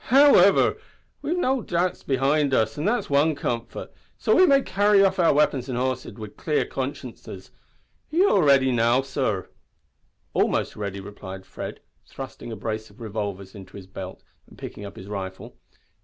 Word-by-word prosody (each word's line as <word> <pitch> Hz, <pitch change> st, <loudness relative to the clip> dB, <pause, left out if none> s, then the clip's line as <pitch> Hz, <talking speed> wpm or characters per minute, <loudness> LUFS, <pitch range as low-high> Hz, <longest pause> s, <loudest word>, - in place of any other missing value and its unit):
"Howiver, 260 Hz, -8 st, +6 dB, 0.4 s
we 290 Hz, -, -5 dB
lave 355 Hz, +2 st, 0 dB
no 265 Hz, -6 st, +1 dB
dibts 175 Hz, -2 st, -1 dB
behind 140 Hz, +1 st, +2 dB
us, 110 Hz, -1 st, +2 dB
that's 210 Hz, -, -1 dB
wan 145 Hz, +2 st, +3 dB
comfort, 120 Hz, -4 st, -4 dB, 0.2 s
so -, -, +2 dB
we 370 Hz, -, +6 dB
may 275 Hz, -2 st, +5 dB
carry 205 Hz, 0 st, +4 dB
off 190 Hz, -1 st, 0 dB
our 170 Hz, -, +5 dB
weapons 140 Hz, -3 st, +1 dB
an' 125 Hz, -, -2 dB
horses 130 Hz, 0 st, -2 dB
wid 110 Hz, -3 st, -10 dB
clear 150 Hz, -2 st, 0 dB
consciences. 125 Hz, -8 st, -6 dB, 0.6 s
Are -, -, -6 dB
ye 365 Hz, +4 st, +5 dB
all 200 Hz, -, +4 dB
ready 135 Hz, -3 st, +4 dB
now, 120 Hz, +2 st, +3 dB
sor?" 130 Hz, -8 st, -2 dB, 0.8 s
"Almost -, -, +1 dB
ready," 100 Hz, -2 st, -4 dB
replied 95 Hz, -1 st, -9 dB
Fred, -, -, -7 dB, 0.3 s
thrusting 120 Hz, -, -8 dB
a -, -, -4 dB
brace 110 Hz, 0 st, -4 dB
of -, -, -20 dB
revolvers 100 Hz, -4 st, -5 dB
into 95 Hz, -1 st, -11 dB
his 95 Hz, -, -10 dB
belt 95 Hz, 0 st, -9 dB, 0.2 s
and -, -, -17 dB
picking 105 Hz, -, -8 dB
up 100 Hz, -, -9 dB
his 95 Hz, -, -10 dB
rifle. 95 Hz, -2 st, -6 dB
130 Hz, 170 wpm, -24 LUFS, 105-170 Hz, 0.8 s, Howiver